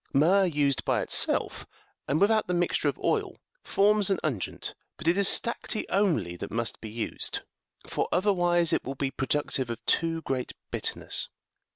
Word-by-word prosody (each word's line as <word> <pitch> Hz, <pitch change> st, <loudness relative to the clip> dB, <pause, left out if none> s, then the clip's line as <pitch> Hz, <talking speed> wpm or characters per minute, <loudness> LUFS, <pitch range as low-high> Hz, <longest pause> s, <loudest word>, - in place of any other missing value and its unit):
Myrrh 180 Hz, +8 st, +4 dB
used 145 Hz, -5 st, +1 dB
by -, -, +1 dB
itself, -, -, 0 dB, 0.4 s
and 145 Hz, +3 st, +1 dB
without 215 Hz, +2 st, +3 dB
the 180 Hz, -, 0 dB
mixture 175 Hz, 0 st, +1 dB
of -, -, -4 dB
oil, -, -, -1 dB, 0.2 s
forms 205 Hz, 0 st, +3 dB
an 195 Hz, -, +2 dB
unguent, 130 Hz, -, -3 dB, 0.2 s
but 155 Hz, -, -6 dB
it 170 Hz, -, +4 dB
is 200 Hz, -1 st, +4 dB
stacte70 230 Hz, -1 st, +1 dB
only 155 Hz, -, +1 dB
that 100 Hz, -, -6 dB
must 115 Hz, +2 st, -3 dB
be 110 Hz, -, -6 dB
used, 110 Hz, +1 st, -2 dB, 0.4 s
for -, -, -2 dB
other 200 Hz, +4 st, +3 dB
wise 175 Hz, -2 st, +2 dB
it -, -, +1 dB
will 135 Hz, -, -5 dB
be 135 Hz, 0 st, -2 dB
productive 135 Hz, -1 st, -1 dB
of 115 Hz, -, -3 dB
too 165 Hz, 0 st, +1 dB
great 130 Hz, -2 st, -3 dB, 0.2 s
bitterness. -, -, -1 dB
165 Hz, 170 wpm, -28 LUFS, 135-195 Hz, 0.4 s, Myrrh